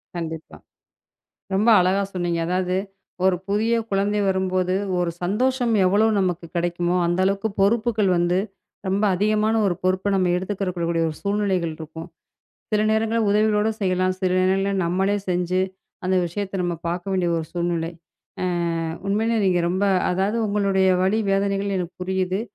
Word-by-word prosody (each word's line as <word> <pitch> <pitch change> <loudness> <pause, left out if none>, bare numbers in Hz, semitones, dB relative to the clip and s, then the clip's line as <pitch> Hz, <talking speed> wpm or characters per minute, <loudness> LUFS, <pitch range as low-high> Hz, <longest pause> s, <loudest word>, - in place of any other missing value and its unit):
கண்டிப்பா. 160 -2 -6 1.0
ரொம்ப 210 +5 +3
அழகா 185 +2 +2
சொன்னீங்க. 175 -2 -1
அதாது 180 0 0 0.5
ஒரு 190 -1 +4
புதிய 215 +3 +1 0.2
குழந்தை 200 +1 +1
வரும்போது 185 -1 0 0.3
ஒரு 175 -1 0
சந்தோஷம் 245 +5 +1
எவ்ளோ 205 +4 +3
நமக்கு 180 -2 -1
கிடைக்குமோ, 175 +1 0
அந்த 175 +2 0
அளவுக்கு 200 +3 0
பொறுப்புகள் 215 -1 +2
வந்து 175 +1 +2 0.5
ரொம்ப 195 +3 0
அதிகமான 215 +3 +1
ஒரு 185 -3 +1
பொறுப்பை 185 +2 +1
நம்ம 185 -2 +2
எடுத்துக்கரக்கூடிய 185 -3 -3
கூடிய 165 -1 +1
ஒரு 155 - -7
சூழ்நிலைகள் 195 -5 0
இருக்கும். 160 +1 -8 0.7
சில 210 - +3
நேரங்கள்ல 225 +1 +1
உதவிகளோடசெய்யலாம். 210 -3 +1
சில 185 - +1
நேரங்கள்ல 195 +2 +1
நம்மளே 190 +4 +1
செஞ்சு 180 +1 0 0.4
அந்த 185 +1 +1
விஷயத்தை 195 +3 -4
நம்ம 175 -1 -1
பாக்க 175 +1 -3
வேண்டிய 180 -2 +1
ஒரு 160 -1 -3
சூழ்நிலை. 170 -1 -1 0.5
அ, - - 0 0.6
உண்மையிலே 220 +3 +1
நீங்க 180 -2 +2
ரொம்ப 190 +3 0 0.3
அதாவது 195 +5 0
உங்களுடைய 195 -2 +2
வலி, 195 +4 +2
வேதனைகள் 195 0 0
எனக்கு 180 -1 -4
புரியுது. 185 +1 -1
190 Hz, 140 wpm, -23 LUFS, 180-205 Hz, 1.0 s, ஒரு